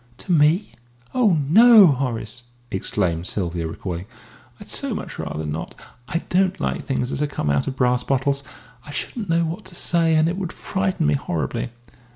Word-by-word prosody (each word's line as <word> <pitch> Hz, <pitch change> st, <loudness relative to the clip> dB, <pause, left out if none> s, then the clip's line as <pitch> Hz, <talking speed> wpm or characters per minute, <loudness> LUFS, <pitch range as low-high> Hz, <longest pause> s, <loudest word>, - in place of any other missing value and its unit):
"To 190 Hz, -, -6 dB
me? 165 Hz, +5 st, +3 dB, 0.4 s
Oh, 220 Hz, -9 st, +3 dB
no, 220 Hz, -, +8 dB
Horace!" 125 Hz, -6 st, -1 dB, 0.3 s
exclaimed 90 Hz, -3 st, -1 dB
Sylvia, 85 Hz, -4 st, -2 dB
recoiling. 85 Hz, +2 st, -5 dB, 0.5 s
"I'd -, -, -11 dB
so -, -, -1 dB
much -, -, -7 dB
rather 80 Hz, 0 st, -4 dB
not. 75 Hz, +2 st, -5 dB, 0.3 s
I 170 Hz, -, -2 dB
don't 190 Hz, +1 st, +2 dB
like -, -, -2 dB
things 130 Hz, -2 st, -1 dB
that -, -, -3 dB
have 150 Hz, 0 st, 0 dB
come 75 Hz, -, -1 dB
out 70 Hz, -, +1 dB
of 135 Hz, -, -3 dB
brass 125 Hz, -1 st, +2 dB
bottles. 140 Hz, +1 st, 0 dB, 0.4 s
I -, -, -14 dB
shouldn't 205 Hz, +7 st, -5 dB
know 165 Hz, 0 st, +2 dB
what 165 Hz, +3 st, -5 dB
to 185 Hz, -1 st, -9 dB
say, 165 Hz, -2 st, +2 dB
and 155 Hz, +1 st, +4 dB
it 175 Hz, +2 st, -1 dB
would 180 Hz, -3 st, -4 dB
frighten 190 Hz, -, -1 dB
me 75 Hz, -, +3 dB
horribly." 75 Hz, -, -2 dB
140 Hz, 180 wpm, -22 LUFS, -, 0.5 s, no